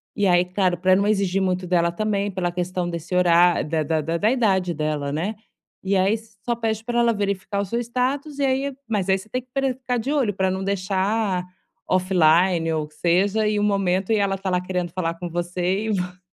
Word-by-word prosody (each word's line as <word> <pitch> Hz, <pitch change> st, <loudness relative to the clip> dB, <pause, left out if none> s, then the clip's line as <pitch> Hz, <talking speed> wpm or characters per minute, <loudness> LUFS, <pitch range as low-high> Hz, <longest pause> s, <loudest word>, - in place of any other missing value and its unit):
e 200 Hz, -1 st, +2 dB
aí, 175 Hz, 0 st, +4 dB
claro, 180 Hz, -1 st, 0 dB
pra 185 Hz, +1 st, +4 dB
não 200 Hz, +1 st, +2 dB
exigir 195 Hz, -2 st, +1 dB
muito 185 Hz, -1 st, -1 dB
dela 170 Hz, -1 st, +2 dB
também, 205 Hz, +1 st, -1 dB
pela 175 Hz, -2 st, -2 dB
questão 180 Hz, 0 st, -2 dB
desse 170 Hz, +1 st, -6 dB
horá 175 Hz, -1 st, +4 dB
da 155 Hz, +1 st, -1 dB
da 160 Hz, +1 st, 0 dB
da 165 Hz, +3 st, -2 dB
da 215 Hz, +6 st, +2 dB
idade 190 Hz, -8 st, +1 dB
dela, 150 Hz, -2 st, -2 dB
né. 180 Hz, +9 st, -2 dB, 0.5 s
E 195 Hz, +1 st, 0 dB
aí 190 Hz, +3 st, +3 dB, 0.3 s
só 240 Hz, -1 st, 0 dB
pede 220 Hz, -1 st, -2 dB
pra 240 Hz, +1 st, -1 dB
ela 235 Hz, -1 st, +3 dB
verificar 200 Hz, 0 st, -2 dB
o -, -, -2 dB
seu 235 Hz, +5 st, -2 dB
status, 260 Hz, +5 st, -2 dB
e 280 Hz, -, -1 dB
aí 270 Hz, +1 st, 0 dB
mas 205 Hz, -4 st, -1 dB
aí 190 Hz, -, +4 dB
você 195 Hz, +3 st, -12 dB
tem 255 Hz, +2 st, -4 dB
pre 270 Hz, -2 st, +1 dB
ficar 250 Hz, -1 st, -3 dB
de 245 Hz, +4 st, -2 dB
olho, 265 Hz, -9 st, +1 dB
pra 190 Hz, 0 st, 0 dB
não 190 Hz, -, -3 dB
deixar 195 Hz, 0 st, 0 dB, 0.4 s
offline 175 Hz, -2 st, +3 dB
ou, 155 Hz, -1 st, -1 dB
que 155 Hz, -, -24 dB
seja, 195 Hz, +5 st, +2 dB
e 210 Hz, 0 st, +1 dB
o -, -, 0 dB
momento, 195 Hz, -1 st, +1 dB
e 220 Hz, -, +4 dB
ela 195 Hz, -1 st, +1 dB
tá 190 Hz, 0 st, -4 dB
lá 180 Hz, 0 st, +1 dB
querendo 180 Hz, -2 st, -3 dB
falar 170 Hz, -2 st, -2 dB
com 175 Hz, +1 st, -6 dB
você, 175 Hz, +4 st, -1 dB
e -, -, -2 dB
vo 180 Hz, -1 st, -3 dB
190 Hz, 220 wpm, -23 LUFS, 175-215 Hz, 0.5 s, aí